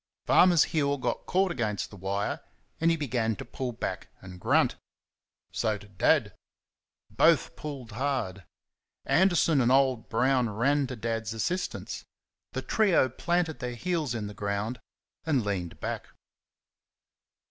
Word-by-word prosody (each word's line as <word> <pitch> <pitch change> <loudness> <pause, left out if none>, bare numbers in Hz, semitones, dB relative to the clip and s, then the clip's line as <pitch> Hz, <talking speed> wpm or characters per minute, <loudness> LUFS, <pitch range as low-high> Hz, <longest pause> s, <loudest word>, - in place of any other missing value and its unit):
Farmer's 175 -3 +6
heel 145 -3 0
got 130 - -3
caught 190 0 +2
against 105 - -2
the - - -10
wire, 100 +2 -2 0.4
and 165 - +3
he 165 - +2
began 120 -7 0
to - - -8
pull 130 -2 -4
back 115 - -4
and 95 -1 -11
grunt - - +3 0.8
so 110 -2 0
did 100 -2 -17
Dad. - - +3 0.8
Both - - +3
pulled 135 -6 -7
hard. 115 -6 -2 0.6
Anderson 170 -5 +4
and 120 0 +3
old 130 -4 +3
Brown 125 +1 +2
ran 135 +7 +1
to 130 - -5
Dad's 115 -1 -3
assistance. 175 - -3 0.5
The - - -3
trio 195 -11 +3
planted 170 +4 -1
their 125 -1 -4
heels 155 -1 -1
in 110 -2 -3
the 105 - -6
ground 100 +4 -3 0.4
and 140 -8 +1
leaned 90 -5 -3
back. - - -4
125 Hz, 135 wpm, -28 LUFS, 105-150 Hz, 0.8 s, Farmer's